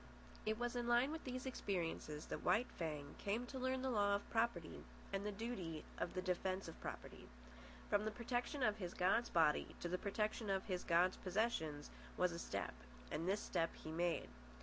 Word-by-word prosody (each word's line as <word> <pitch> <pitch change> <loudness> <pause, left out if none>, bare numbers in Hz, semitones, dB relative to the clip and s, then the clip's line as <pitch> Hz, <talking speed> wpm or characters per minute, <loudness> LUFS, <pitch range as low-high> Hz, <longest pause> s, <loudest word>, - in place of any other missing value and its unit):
It 215 0 +2
was 240 +1 -1
in 240 -1 0
line 240 +4 +5
with 320 -1 -5
these 255 0 -3
experiences 170 - -2
that - - -4
White 230 +3 +4
Fang 150 -4 -3
came 215 +5 0
to 260 +2 -5
learn 260 0 +1
the 265 - +1
law 205 -3 +4
of 200 - -3
property 225 -8 0 0.3
and 195 0 0
the 210 - -1
duty 195 -7 -3 0.2
of - - -1
the 185 - 0
defence 185 +1 0
of 165 - -9
property. - - -6 0.6
From 205 +1 +3
the - - +2
protection 245 +4 -1
of 215 -2 +3
his 180 -4 -4
god's 195 +6 +3
body 160 -3 +3
to - - -2
the 180 +1 -1
protection 210 +1 0
of 195 -1 +1
his 180 -3 -1
god's 175 +2 +4
possessions 180 -7 0 0.3
was 180 -1 +4
a 170 - -4
step, - - -2 0.4
and 165 - -1
this 205 +2 +2
step 165 -2 0
he 155 - -7
made. 170 +1 +1
200 Hz, 195 wpm, -41 LUFS, 175-235 Hz, 0.6 s, line